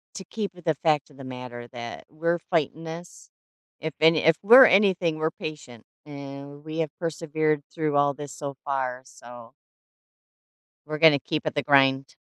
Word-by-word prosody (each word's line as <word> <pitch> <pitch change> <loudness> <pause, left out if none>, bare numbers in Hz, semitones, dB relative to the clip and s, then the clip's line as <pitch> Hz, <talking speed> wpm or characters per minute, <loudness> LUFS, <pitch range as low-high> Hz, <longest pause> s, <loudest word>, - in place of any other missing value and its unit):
to 190 - -7
keep 205 0 -5
with 175 -2 -16
the 160 -2 +1
fact 150 -1 0
of 135 - -19
the 135 - -11
matter 125 -2 -8
that 120 -1 -8
we're 170 +3 -1
fighting 165 -1 -2
this. 165 +2 -10 0.5
If 160 -2 -4
any 160 0 +5
if 165 0 +5
we're 245 +5 +10
anything, 185 -6 +3
we're 155 +1 0
patient, 140 -9 -9 0.2
and 140 0 -10
we 160 +1 -6
have 160 -2 -1
persevered 155 -2 -1
through 155 -3 -1
all 145 0 +3
this 145 0 -9
so 140 -1 -6
far, 130 -2 -3
so 120 -2 -14 1.4
we're 155 0 -4
gonna 155 -3 +6
keep 155 +3 -4
at - - -2
the 145 - 0
grind. 135 -2 +3
150 Hz, 170 wpm, -25 LUFS, 135-165 Hz, 1.4 s, we're